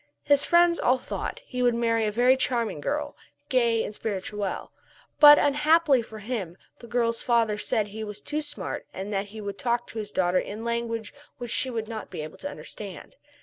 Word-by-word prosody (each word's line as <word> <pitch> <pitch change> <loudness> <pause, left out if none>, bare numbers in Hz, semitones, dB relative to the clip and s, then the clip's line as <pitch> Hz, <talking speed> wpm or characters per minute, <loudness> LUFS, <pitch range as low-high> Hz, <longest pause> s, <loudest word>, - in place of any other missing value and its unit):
His 285 -1 +4
friends 345 0 +4
all 255 +1 +3
thought - - -4
that - - -15
he 250 - -4
would 245 -1 +3
marry 230 -2 +1
a - - 0
very 245 +4 +4
charming 235 - -1
girl, 295 - -2 0.3
gay 235 -4 +2
and - - -5
spirituelle. 205 -1 -4 0.5
But, 295 0 +10
unhappily 295 -1 +4
for 220 -1 -10
him, 210 -6 -4 0.2
the 235 - -11
girl's 230 -1 0
father 230 -3 +2
said 215 0 +1
that 205 - -13
he 220 +1 -5
was 210 -1 -6
too 300 +1 -3
smart 295 -1 -5
and 195 +2 -5
that 195 +1 -1
he 215 +1 -9
would 200 -1 -6
talk 240 -2 0
to 225 - -6
his 210 -1 -5
daughter 180 0 +2
in 215 +3 -6
language 235 -2 -2 0.2
which 240 -2 -6
she 260 - 0
would 225 -3 -3
not 220 -1 -6
be - - -6
able 155 0 -8
to 285 - -4
understand. 210 -9 -9
230 Hz, 205 wpm, -26 LUFS, 210-255 Hz, 0.5 s, But